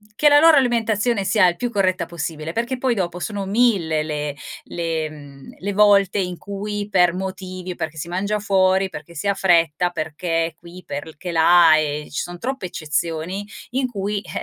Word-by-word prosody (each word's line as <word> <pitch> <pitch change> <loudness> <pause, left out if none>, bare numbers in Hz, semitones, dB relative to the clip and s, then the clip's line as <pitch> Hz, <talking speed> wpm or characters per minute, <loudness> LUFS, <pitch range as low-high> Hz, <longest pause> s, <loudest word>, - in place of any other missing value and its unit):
che 295 +7 +5
la 290 0 +7
loro 325 0 +7
alimentazione 230 -4 +1
sia 200 -1 +4
il 175 - +1
più 245 +6 -3
corretta 185 -5 +1
possibile, 160 -2 -5
perché 240 +5 -2
poi 250 -1 +1
dopo 180 -3 -2
sono 200 +3 -4
1000 195 -7 +2
le 150 -2 -3 0.3
le 165 -2 -3
mhmm, 145 -3 -13
le 200 +2 -3
volte 200 -1 +4
in 180 -2 -2
cui 205 +1 -5
per 180 -3 +4
motivi 185 -1 -5
perché 160 -1 -5
si 155 - -5
mangia 200 +4 -1
fuori, 190 -1 +2
perché 170 -1 -10
si 165 - -3
ha 200 - +2
fretta, 175 -2 +2
perché 165 0 -2
qui, 175 +2 -13
perché 160 +4 -6
là, 165 0 +6
e 150 -1 -2
ci - - -2
son 175 0 -7
troppe 260 -2 -4
eccezioni 165 +4 -3 0.3
in 260 +1 0
cui, 205 -2 -3
eh, - - -15
185 Hz, 180 wpm, -21 LUFS, 165-205 Hz, 0.3 s, la